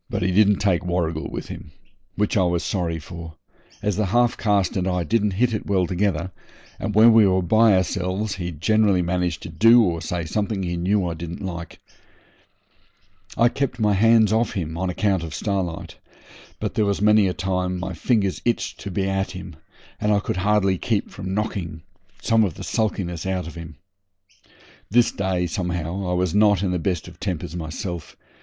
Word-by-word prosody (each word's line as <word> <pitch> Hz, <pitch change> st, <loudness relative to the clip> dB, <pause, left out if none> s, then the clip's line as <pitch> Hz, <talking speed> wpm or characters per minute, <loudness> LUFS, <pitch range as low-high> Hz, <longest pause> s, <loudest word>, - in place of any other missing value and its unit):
He 100 Hz, -5 st, -1 dB
didn't 105 Hz, +2 st, +5 dB
take 95 Hz, -4 st, +1 dB
Warrigal 85 Hz, -3 st, -2 dB
with -, -, -6 dB
him, 75 Hz, -, -9 dB, 0.4 s
which 105 Hz, 0 st, 0 dB
I 100 Hz, -, +4 dB
was 85 Hz, -2 st, +1 dB
sorry 85 Hz, -4 st, -1 dB
for, 80 Hz, 0 st, -9 dB, 0.5 s
as 105 Hz, -2 st, 0 dB
the 105 Hz, -2 st, +1 dB
half 120 Hz, +4 st, +2 dB
caste 100 Hz, -3 st, +1 dB
and 95 Hz, -1 st, 0 dB
I 90 Hz, -1 st, 0 dB
didn't 105 Hz, +3 st, +1 dB
hit 115 Hz, +4 st, +1 dB
it 110 Hz, -, -4 dB
well 95 Hz, -3 st, +2 dB
together, 90 Hz, -1 st, -1 dB, 0.5 s
and 105 Hz, -, -3 dB
when 115 Hz, +2 st, +7 dB
we 110 Hz, -2 st, +6 dB
were 95 Hz, -1 st, +2 dB
by 110 Hz, +3 st, +5 dB
ourselves 95 Hz, +2 st, -1 dB
he 90 Hz, -2 st, -3 dB
generally 100 Hz, +3 st, +2 dB
managed 90 Hz, -1 st, -1 dB
to -, -, -7 dB
do 115 Hz, +8 st, +6 dB
or 85 Hz, -5 st, -1 dB
say 85 Hz, 0 st, -3 dB
something 100 Hz, +3 st, -2 dB
he 85 Hz, -1 st, -2 dB
knew 95 Hz, +3 st, +1 dB
I 85 Hz, -, -2 dB
didn't 85 Hz, +3 st, -7 dB
like. 85 Hz, -2 st, -6 dB, 1.6 s
I 120 Hz, -, +5 dB
kept 130 Hz, 0 st, -2 dB
my 105 Hz, -2 st, +3 dB
hands 110 Hz, +1 st, +4 dB
off 115 Hz, +1 st, +1 dB
him 80 Hz, -4 st, -3 dB
on 95 Hz, +2 st, -2 dB
account 95 Hz, 0 st, 0 dB
of 80 Hz, -2 st, -6 dB
Starlight, 95 Hz, -4 st, -3 dB, 0.6 s
but -, -, -3 dB
there 110 Hz, -, +1 dB
was 100 Hz, -1 st, 0 dB
many 105 Hz, -1 st, +4 dB
a 90 Hz, -, -1 dB
time 90 Hz, 0 st, -1 dB
my 95 Hz, +1 st, -4 dB
fingers 100 Hz, +2 st, 0 dB
itched 120 Hz, -, -1 dB
to 100 Hz, -, -6 dB
be 95 Hz, +1 st, -1 dB
at 95 Hz, 0 st, -1 dB
him, 90 Hz, -2 st, -8 dB, 0.4 s
and 105 Hz, -, +1 dB
I 105 Hz, -, +3 dB
could 95 Hz, -, -3 dB
hardly 95 Hz, -1 st, +2 dB
keep 110 Hz, -4 st, -1 dB
from 95 Hz, -1 st, -5 dB
knocking 90 Hz, -7 st, -3 dB, 0.4 s
some 115 Hz, -1 st, +3 dB
of 95 Hz, -7 st, -1 dB
the -, -, -8 dB
sulkiness 95 Hz, -6 st, -2 dB
out 95 Hz, -1 st, -1 dB
of 85 Hz, -, -8 dB
him. 85 Hz, -2 st, -9 dB, 1.1 s
This 120 Hz, +3 st, +4 dB
day, 95 Hz, -2 st, -1 dB
somehow, 90 Hz, 0 st, -3 dB
I -, -, 0 dB
was 90 Hz, -2 st, 0 dB
not 105 Hz, -2 st, +4 dB
in 95 Hz, -, 0 dB
the 90 Hz, -, -1 dB
best 85 Hz, 0 st, -2 dB
of -, -, -13 dB
tempers 90 Hz, -4 st, -4 dB
myself. 85 Hz, +1 st, -6 dB
95 Hz, 190 wpm, -23 LUFS, 85-105 Hz, 1.6 s, when